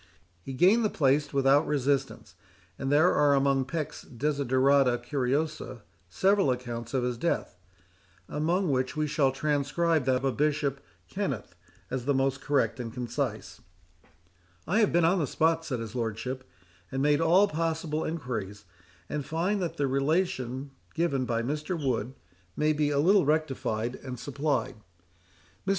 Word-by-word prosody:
He 135 - -7
gained 190 - +4
the 215 - +2
place 145 -2 +1
without 140 +2 +3
resistance; 140 -1 -1 0.5
and 135 0 -2
there 155 +5 +5
are 145 -1 +4
among 135 -1 +2
Peck's 155 +1 -4
Desiderata 135 -1 +2
Curiosa 130 -1 -2 0.3
several 195 - +2
accounts 120 -1 -3
of 130 - +1
his 125 -1 -2
death, 170 - -1 0.7
among 170 +3 0
which 130 +2 -1
we 155 - +1
shall 145 -2 +2
transcribe 150 +2 0
that 130 0 +1
of 135 - -1
Bishop 145 -2 0 0.3
Kenneth, 140 - -4 0.4
as 125 -1 -3
the 140 0 +2
most 135 +1 0
correct, 145 -1 0
and 115 -2 -5
concise:—"I 90 - -6
have 215 - +3
been 170 0 +3
on 180 +3 +3
the 150 - 0
spot," 165 +3 +1
saith 130 -5 -2
his 115 -1 -6
Lordship, 125 +3 -4 0.4
"and 135 0 -1
made 150 +1 +3
all 180 +5 +5
possible 160 -2 -2
enquiries, 110 - -4 0.4
and 150 -1 -3
find 175 +8 -1
that 170 -2 -3
the 145 - +1
relation 135 -2 -1 0.2
given 160 -6 0
by 115 -1 -1
Mr. 150 +6 -3
Wood 130 -3 -2 0.4
may 155 +1 +2
be 150 -1 +1
a 145 - 0
little 185 +7 +5
rectified 130 -6 -1
and 125 -2 -8
supplied. 140 -1 -2 0.9
"Mr. - - +1
140 Hz, 145 wpm, -28 LUFS, 125-155 Hz, 0.9 s, there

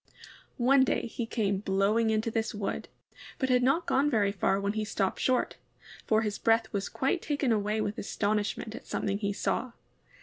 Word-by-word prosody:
One 260 +2 +5
day 260 - 0
he 235 0 -4
came 200 -4 0
blowing 205 +3 +2
into 220 +1 0
this 225 0 -1
wood, 205 -1 -3 0.5
but 260 - -1
had 250 -1 +4
not 275 +7 +2
gone 285 -3 +2
very 205 -6 +2
far 195 -1 +1
when 200 +1 -1
he 215 0 -1
stopped 200 -3 -1
short, 255 -1 +1 0.5
for 220 0 +3
his 210 -1 -3
breath 225 -1 +2
was 200 -1 -2
quite 275 +6 0
taken 290 -4 0
away 215 0 +1
with 210 0 -3
astonishment 210 +1 -1
at - - -10
something 200 0 -1
he 200 -1 -1
saw. 235 +4 -2
220 Hz, 180 wpm, -29 LUFS, 205-245 Hz, 0.5 s, One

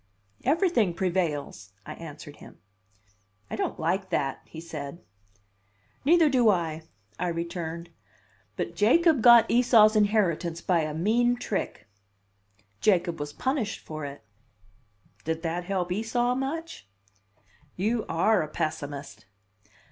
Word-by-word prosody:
"Everything 275 - +2
prevails," 155 - -2
I - - -7
answered 150 -2 -10
him. - - -14 0.9
"I - - -2
don't - - -3
like 185 +4 -1
that," 135 -6 -1
he 160 - -10
said. 160 -1 -7 1.0
"Neither 330 +2 +5
do 250 -5 +4
I," 165 -5 0 0.4
I 180 - -1
returned. 170 0 -4 0.6
"But 170 - -4
Jacob 280 - +4
got 235 -1 +8
Esau's 230 -3 +5
inheritance 190 -6 +1
by 175 -1 +1
a 155 -1 -2
mean 235 +8 +2
trick." 215 - -4 0.9
"Jacob 175 -5 +2
was 145 0 -4
punished 250 - -2
for 155 -1 -7
it." 140 -4 -7 1.0
"Did 160 +1 -3
that 170 +1 -2
help 180 -2 -2
Esau 240 +5 0
much?" 275 - -4 0.9
"You 220 +4 0
are 200 +5 +3
a 155 - -3
pessimist!" 140 -8 -5
180 Hz, 120 wpm, -27 LUFS, 160-230 Hz, 1.0 s, got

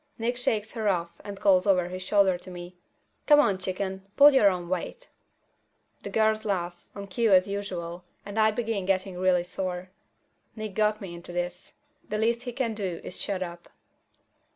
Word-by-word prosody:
Nick 235 +2 -1
shakes 220 -3 -1
her 220 -3 -2
off 170 -3 -2
and 200 -1 -7
calls 190 -1 +4
over 180 -3 +3
his 185 +1 -6
shoulder 190 -1 +3
to 180 +1 -10
me, 175 0 -9 0.5
"Come 295 -1 +7
on, 200 -10 +3
chicken, 190 +1 -4
pull 290 +1 +9
your 215 -7 +6
own 180 -2 -3
weight!" 185 - -4 0.9
The - - -6
girls 220 0 +2
laugh, 175 -4 -3
on 200 -1 -6
cue 225 +3 +1
as 185 0 +6
usual, 180 -4 -5 0.2
and 205 +2 -4
I 215 0 +5
begin 220 -3 -2
getting 190 -1 0
really 185 -1 +3
sore. 185 0 -5 0.6
Nick 215 -3 -5
got 215 +1 +1
me 185 -3 -7
into 170 0 -10
this. 175 0 -4 0.4
The 210 - -1
least 230 +2 +1
he - - -4
can 235 -2 -1
do 190 -5 -3
is 180 - -5
shut 190 -2 -1
up. 170 -1 -9
195 Hz, 180 wpm, -27 LUFS, 180-215 Hz, 0.9 s, pull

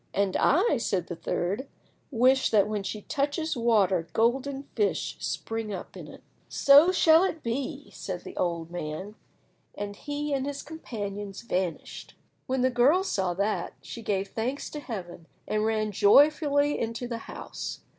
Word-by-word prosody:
"And 200 -2 +1
I," 345 - +3
said 190 -6 -1
the 175 - -6
third, 190 +9 -2 0.4
"wish 260 +1 +3
that 210 -2 +4
when 210 -1 -2
she 200 +2 -5
touches 300 +2 -1
water 200 -8 +2
golden 270 +4 +1
fish 415 - 0
spring 225 -1 -3
up 190 - -7
in - - -9
it." - - -13 0.3
"So 285 +6 +6
shall 330 -2 +5
it 330 -4 -2
be," 275 +5 -4
said 180 -2 -6
the - - -9
old 170 -2 -2
man, 175 +4 -5 0.6
and 205 0 -5
he 290 +4 -4
and 270 0 -1
his 285 -1 -4
companions 205 -10 -6
vanished. 185 -7 -4 0.3
When 260 0 0
the 255 +1 +3
girl 270 +10 +4
saw 190 - -1
that, 200 +3 -1
she 230 - -8
gave 200 -2 -1
thanks 250 +5 -3
to 300 - -5
Heaven, 180 - -7 0.2
and 215 0 0
ran 215 -1 0
joyfully 285 - +4
into 230 +2 -3
the 235 -1 -4
house. - - -6
230 Hz, 155 wpm, -27 LUFS, 200-280 Hz, 0.6 s, So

